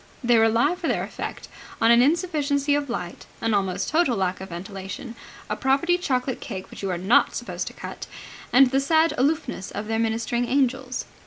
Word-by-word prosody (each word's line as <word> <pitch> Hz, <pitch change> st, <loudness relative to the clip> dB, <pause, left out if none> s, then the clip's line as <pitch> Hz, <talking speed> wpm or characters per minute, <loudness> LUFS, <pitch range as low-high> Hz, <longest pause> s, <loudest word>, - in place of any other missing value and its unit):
They 240 Hz, -1 st, +4 dB
rely 230 Hz, +8 st, +3 dB
for 360 Hz, -, -4 dB
their -, -, 0 dB
effect -, -, -6 dB, 0.3 s
on 225 Hz, +1 st, +5 dB
an 235 Hz, 0 st, +7 dB
insufficiency 290 Hz, -2 st, +1 dB
of 290 Hz, -1 st, 0 dB
light, 180 Hz, -7 st, -5 dB
an 225 Hz, -1 st, 0 dB
almost 195 Hz, -1 st, 0 dB
total 310 Hz, -7 st, +2 dB
lack 185 Hz, -1 st, -1 dB
of 190 Hz, -, -7 dB
ventilation, 190 Hz, +5 st, -7 dB, 0.3 s
a -, -, -2 dB
property 290 Hz, +7 st, +2 dB
chocolate 255 Hz, -6 st, -1 dB
cake 190 Hz, -5 st, -7 dB
which -, -, -9 dB
you 195 Hz, -, -2 dB
are 180 Hz, -, -1 dB
not 190 Hz, +7 st, +3 dB
supposed -, -, -4 dB
to -, -, -6 dB
cut, -, -, -8 dB, 0.4 s
and 260 Hz, 0 st, +6 dB
the 270 Hz, -, +3 dB
sad 320 Hz, +4 st, +3 dB
aloofness 275 Hz, -, -1 dB
of 205 Hz, -, -5 dB
their 225 Hz, 0 st, -1 dB
ministering 230 Hz, +2 st, 0 dB
angels. 260 Hz, -1 st, 0 dB
245 Hz, 185 wpm, -24 LUFS, 205-280 Hz, 0.4 s, an